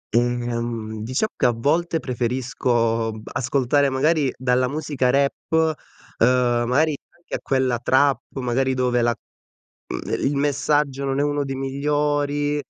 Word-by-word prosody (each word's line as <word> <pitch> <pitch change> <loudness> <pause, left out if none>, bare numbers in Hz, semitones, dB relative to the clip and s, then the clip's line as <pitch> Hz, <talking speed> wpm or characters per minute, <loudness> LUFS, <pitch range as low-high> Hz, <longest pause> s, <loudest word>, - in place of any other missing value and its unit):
Ehm, 120 -2 -1
diciamo 130 - -1
che - - +2
a 120 - +3
volte 165 +8 +1
preferisco 120 -3 0
b 110 - -9
ascoltare 135 +3 +1
magari 145 +1 +2
dalla 125 0 +1
musica 145 -3 -1
rap, 140 +1 0 0.7
ehm, 120 0 +3
magari 150 +4 +2 0.2
anche 175 - -16
a - - -1
quella 130 -3 0
trap, 135 +3 +3 0.2
magari 130 +1 0
dove 125 -1 +1
la 120 -1 +2 0.7
ehm, - - -4 0.2
il 140 - +1
messaggio 140 -1 0
non 135 0 -1
è - - +3
uno 145 0 0
dei 135 -1 -4
migliori, 145 +1 0
130 Hz, 135 wpm, -22 LUFS, 120-145 Hz, 0.7 s, a